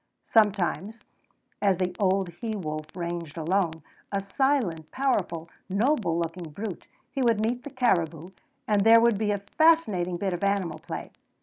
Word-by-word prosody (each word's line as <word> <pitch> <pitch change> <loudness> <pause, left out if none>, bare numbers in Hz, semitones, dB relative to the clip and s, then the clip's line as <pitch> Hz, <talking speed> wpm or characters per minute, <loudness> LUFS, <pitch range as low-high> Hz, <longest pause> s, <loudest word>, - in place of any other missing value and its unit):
Sometimes 210 0 +1 0.6
as 195 -3 +3
the 180 -1 -1
old 190 -2 +2
he 215 +6 -5
wolf 155 -5 -4
ranged 170 -3 -4
alone, 165 -1 0 0.3
a 200 - 0
silent, 195 - 0
powerful, 195 -11 -1 0.2
noble 200 - +1
looking 170 0 -3
brute, 200 +3 -6 0.2
he 275 - -2
would 230 -4 +3
meet 245 +2 -2
the - - -6
caribou, 175 - 0 0.4
and 210 -2 +3
there 225 +2 +8
would 230 -3 +3
be 215 -1 0
a 205 - +1 0.2
fascinating 215 - +4
bit 190 +1 -1
of 175 - -4
animal 190 -5 0
play. - - -7
195 Hz, 150 wpm, -27 LUFS, 170-225 Hz, 0.6 s, there